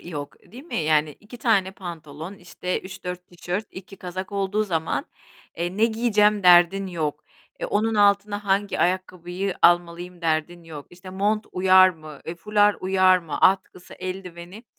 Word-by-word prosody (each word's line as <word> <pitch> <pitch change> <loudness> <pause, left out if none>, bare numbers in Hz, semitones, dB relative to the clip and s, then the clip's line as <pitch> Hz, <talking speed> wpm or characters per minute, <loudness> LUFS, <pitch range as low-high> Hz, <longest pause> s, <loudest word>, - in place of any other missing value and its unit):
yok, 145 -4 -7 0.2
değil 260 +5 -11
mi? - - -6
Yani 155 -1 +2
2 230 +4 -13
tane 200 -6 +2
pantolon, 165 -1 -8
işte, 180 0 -5
3-4 180 -1 -8
tişört, 180 +4 -5
2 195 +1 -11
kazak 185 +2 -7
olduğu 200 +2 0
zaman, 165 -4 -2 0.5
eee, 175 +2 -3
ne 220 - +4
giyeceğim 210 -3 +2
derdin 180 +2 +5
yok. 155 -4 -4 0.4
E, - - -3
onun 220 +2 0
altına 205 0 +2
hangi 200 +1 0
ayakkabıyı 185 +1 -2
almalıyım 175 +1 +2
derdin 165 +1 -2
yok. 155 -3 -10
İşte, 180 +1 -12
mont 205 +3 -1
uyar 185 0 +6
mı, 155 -4 -10
eee, 165 - -4
fular 205 +3 +2
uyar 185 0 +4
mı? 165 -4 -6
Atkısı, 185 -1 +1
eldiveni... 185 +2 -8
185 Hz, 150 wpm, -24 LUFS, 170-200 Hz, 0.5 s, uyar